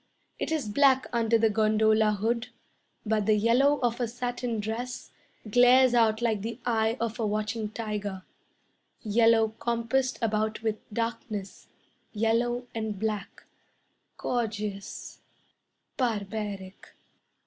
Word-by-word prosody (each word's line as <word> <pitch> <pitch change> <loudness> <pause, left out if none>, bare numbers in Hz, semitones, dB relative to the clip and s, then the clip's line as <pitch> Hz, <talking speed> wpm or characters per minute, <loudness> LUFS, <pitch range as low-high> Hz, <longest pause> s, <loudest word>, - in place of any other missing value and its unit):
It - - -2
is 305 -8 -1
black 265 +4 +4
under 230 -1 +3
the 225 -1 +3
gondola 215 0 +3
hood, 230 +4 -1 0.6
But 215 -1 0
the 215 - +5
yellow 245 +7 +3
of 240 -1 0
a 240 - 0
satin 245 -1 -3
dress 225 +4 -5 0.4
Glares 245 +3 +6
out 225 -1 +3
like 220 -4 +1
the 230 +3 -5
eye 225 -1 +1
of 230 0 -3
a 220 - 0
watching 215 +1 -2
tiger. 210 -3 -4 0.8
Yellow 225 0 +4
compassed 240 +2 0
about 215 -1 -1
with 220 -1 0
darkness, 215 -3 -4 0.5
Yellow 235 +3 +1
and 220 -2 -3
black, 210 -1 -4 0.7
Gorgeous 210 -4 -4 0.8
barbaric. 205 -5 -4
225 Hz, 115 wpm, -28 LUFS, 215-240 Hz, 0.8 s, Glares